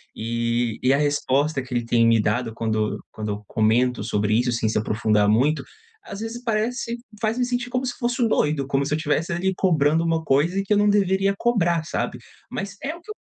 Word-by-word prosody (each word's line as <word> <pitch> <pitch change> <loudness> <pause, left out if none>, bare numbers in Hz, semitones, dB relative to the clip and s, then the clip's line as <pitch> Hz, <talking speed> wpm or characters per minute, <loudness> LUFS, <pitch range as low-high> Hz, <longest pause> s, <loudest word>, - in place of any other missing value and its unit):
E 115 +1 -1 0.3
e 130 +2 +4
a - - +3
resposta 145 0 +1
que 130 0 -9
ele 120 -1 -1
tem 115 0 +3
me 115 -1 +4
dado, 115 +2 -1
quando 110 -1 -1
quando 110 -1 -4
eu 105 +1 -5
comento 120 +3 +1
sobre 105 +1 0
isso, 125 +1 +1
assim, 115 -2 0
se 110 - 0
aprofundar 105 -1 +1
muito, 135 +9 +2 0.4
às 200 - -8
vezes, 225 +2 -5
parece 235 +1 -1 0.2
faz 220 +1 0
me 250 - +1
sentir 245 0 -2
como 255 +1 -1
se 250 - -2
fosse 240 0 -1
o 230 - +4
doido, 150 -8 +1
como 140 0 0
se 145 - -2
eu - - +1
tivesse, 155 +3 -1
ali, 190 +3 0
cobrando 160 -3 +2
uma 165 -1 0
coisa 160 +7 +2
que 210 - +2
eu 205 - +3
não 205 0 +4
deveria 195 -1 +2
cobrar, 175 -9 +1
sabe, - - -3 0.3
mas 200 +1 -5
é 310 +4 -3
o 340 - -14
que 425 - -21
eu 425 - -8
150 Hz, 220 wpm, -23 LUFS, -, 0.4 s, e